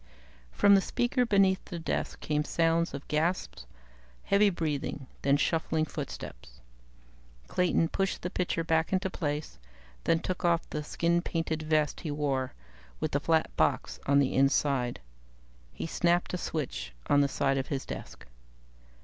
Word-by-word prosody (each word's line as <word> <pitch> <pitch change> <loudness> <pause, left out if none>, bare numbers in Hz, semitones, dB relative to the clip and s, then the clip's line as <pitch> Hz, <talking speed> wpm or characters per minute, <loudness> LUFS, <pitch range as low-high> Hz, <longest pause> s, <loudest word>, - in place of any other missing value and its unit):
"_ - - -28 0.5
From 200 - +5
the 195 - +6
speaker 245 +4 0
beneath 195 -2 +3
the 175 - -6
desk 165 - -3
came 150 -1 0
sounds 165 +2 +1
of 140 - -8
gasps, 155 - -1 0.6
heavy 200 +1 +4
breathing, 150 -5 -3 0.2
then 140 +1 +3
shuffling 160 +1 +1
footsteps. 60 - -8 0.9
Clayton 175 -2 +2
pushed 195 +1 -1
the 180 - -2
picture 175 -3 -1
back 160 -1 +1
into 190 0 0
place, 145 - -3 0.5
then 165 - +4
took 185 +3 -4
off 170 -1 +2
the 150 - -3
skin 170 +3 +1
painted 165 -2 -2
vest 155 -1 +1
he 160 - -5
wore, 140 -3 -1 0.5
with - - -1
the 145 - +1
flat 160 +2 +1
box - - +1
on 140 0 +5
its 130 - -1
inside. 135 - +2 0.7
He - - -5
snapped 175 +2 +1
a - - 0
switch 150 - -4
on 145 - +5
the 140 - +3
side 135 0 +1
of 135 - -3
his 140 -2 -3
desk. - - -8
160 Hz, 155 wpm, -29 LUFS, 140-175 Hz, 0.9 s, the